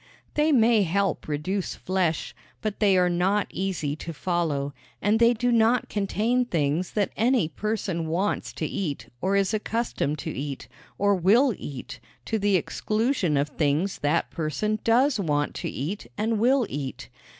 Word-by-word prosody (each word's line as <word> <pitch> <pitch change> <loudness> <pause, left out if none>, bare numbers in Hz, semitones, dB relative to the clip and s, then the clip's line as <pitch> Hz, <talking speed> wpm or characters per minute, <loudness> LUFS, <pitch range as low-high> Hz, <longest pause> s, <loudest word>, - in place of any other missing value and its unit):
They 300 +1 +2
may 230 -4 +5
help 195 0 0
reduce 175 +6 -2
flesh, 185 -4 -1 0.3
but 215 -2 -2
they 200 -3 +4
are 180 0 +4
not 185 +4 +1
easy 180 -7 -2
to 165 +2 -6
follow 150 -5 -1 0.3
and 210 +2 +2
they 235 0 +6
do 245 +1 0
not 230 +1 +3
contain 215 +5 +1
things 165 -5 -1
that 205 -3 0
any 235 -4 +2
person 190 -5 -2
wants 180 +6 -1
to - - -3
eat 165 -8 -3
or 190 +2 +1
is 200 +1 +2
accustomed 215 - -1
to - - -4
eat, 140 0 -5 0.3
or 205 0 +3
will 215 +8 +4
eat, 140 -6 -8 0.3
to 220 - -1
the 205 -1 +2
exclusion 215 - 0
of 140 +2 +1
things 155 +6 0
that 150 +3 0
person 170 +7 -1
does 250 +2 +3
want 145 -5 0
to - - -3
eat 150 +2 -4
and 220 0 0
will 255 +2 +3
eat. 140 -2 -5
195 Hz, 160 wpm, -26 LUFS, 160-220 Hz, 0.3 s, they